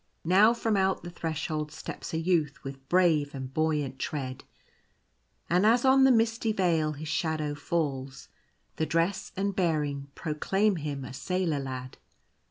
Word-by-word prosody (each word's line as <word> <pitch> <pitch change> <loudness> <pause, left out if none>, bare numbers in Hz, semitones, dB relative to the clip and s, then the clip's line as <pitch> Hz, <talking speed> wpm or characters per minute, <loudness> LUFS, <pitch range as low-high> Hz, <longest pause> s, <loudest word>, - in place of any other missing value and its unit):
Now 205 +7 +5
from 225 -2 0
out 190 -2 +1
the 175 - -7
Threshold 155 -2 -3
steps - - -7
a 160 - -1
Youth 165 -4 0
with 135 -1 -9
brave 160 -6 +3
and 130 -1 -6
buoyant 150 -4 0
tread; 130 -4 -4 1.0
and 180 +3 +3
as 235 +4 +4
on 265 0 +6
the 265 - +6
misty 225 -1 +2
veil 165 -6 +1
his 155 +2 -7
shadow 155 -1 -1
falls, 140 -3 -3 0.5
the 160 - 0
dress 170 +4 0
and 200 0 -1
bearing 150 -6 0
proclaim 190 +6 0
him 145 -3 -4
a 125 - -8
sailor 180 0 -1
lad. 130 -1 -6
160 Hz, 150 wpm, -28 LUFS, 145-185 Hz, 1.0 s, on